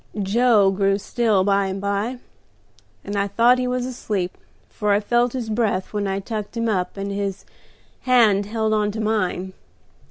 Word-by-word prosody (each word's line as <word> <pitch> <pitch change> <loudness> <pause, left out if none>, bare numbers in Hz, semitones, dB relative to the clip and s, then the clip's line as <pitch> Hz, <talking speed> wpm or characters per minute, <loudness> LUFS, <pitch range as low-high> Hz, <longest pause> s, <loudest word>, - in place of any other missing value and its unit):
"Joe 210 -1 +4
grew 195 0 +1
still 215 -2 +1
by 200 0 +2
and 190 +1 -4
by, 200 +5 -2 0.9
and 205 - -5
I 200 0 +1
thought 235 +5 +4
he 250 - -1
was 250 0 -1
asleep, 210 -7 -3 0.3
for 210 -1 -1
I 200 - +3
felt 240 +3 +1
his 250 -4 -3
breath 215 -4 -1
when 205 -1 -1
I 195 0 -1
tucked 215 +2 -5
him 230 0 0
up, 190 -3 -1
and 200 0 -4
his 200 -1 -4 0.5
hand 220 -6 +3
held 220 0 -1
on 210 -1 +1
to 220 - -5
mine. 200 -4 -1
205 Hz, 170 wpm, -22 LUFS, 195-230 Hz, 0.9 s, Joe